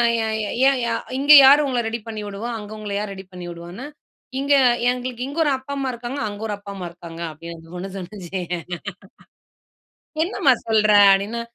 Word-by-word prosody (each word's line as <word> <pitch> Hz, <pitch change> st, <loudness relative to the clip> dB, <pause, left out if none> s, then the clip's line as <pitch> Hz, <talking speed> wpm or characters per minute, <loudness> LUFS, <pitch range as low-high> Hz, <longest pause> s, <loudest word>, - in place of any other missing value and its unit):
ஏ 230 Hz, -, 0 dB, 0.2 s
ஏ -, -, -4 dB, 0.2 s
ஏன் 275 Hz, -2 st, 0 dB
யா 235 Hz, -, 0 dB, 0.2 s
இங்க 285 Hz, +2 st, +3 dB
யாரு 285 Hz, +3 st, +8 dB
உங்கள 250 Hz, -3 st, 0 dB
ரெடி 230 Hz, +1 st, -3 dB
பண்ணி 220 Hz, -1 st, -5 dB
விடுவா? 205 Hz, +4 st, -5 dB
அங்க 210 Hz, 0 st, -10 dB
உங்கள 210 Hz, -1 st, -6 dB
யாரு 210 Hz, -1 st, -4 dB
ரெடி 190 Hz, 0 st, -10 dB
பண்ணி 180 Hz, -1 st, -8 dB
விடுவான்னு 175 Hz, +8 st, -9 dB, 0.5 s
இங்க 280 Hz, +1 st, +2 dB, 0.4 s
எங்களுக்கு 250 Hz, 0 st, -4 dB
இங்க 285 Hz, +4 st, -5 dB
ஒரு 295 Hz, -, +1 dB
அப்பா 260 Hz, +2 st, -8 dB
அம்மா 270 Hz, -1 st, -2 dB
இருக்காங்க, 240 Hz, +4 st, -6 dB
அங்க 205 Hz, 0 st, -7 dB
ஒரு 210 Hz, -, -3 dB
அப்பா 200 Hz, 0 st, -10 dB
அம்மா 180 Hz, -2 st, -5 dB
இருக்காங்க 170 Hz, -1 st, -10 dB
அப்படின்னு 165 Hz, +2 st, -9 dB
அந்த 165 Hz, 0 st, -16 dB
பொண்ணு 185 Hz, +2 st, -5 dB
சொல்லுச்சு! 190 Hz, -1 st, -6 dB, 1.8 s
என்னம்மா 320 Hz, -7 st, +3 dB
சொல்ற? 215 Hz, -1 st, +3 dB, 0.2 s
அப்படினா 205 Hz, +4 st, 0 dB
215 Hz, 180 wpm, -22 LUFS, 190-255 Hz, 1.8 s, யாரு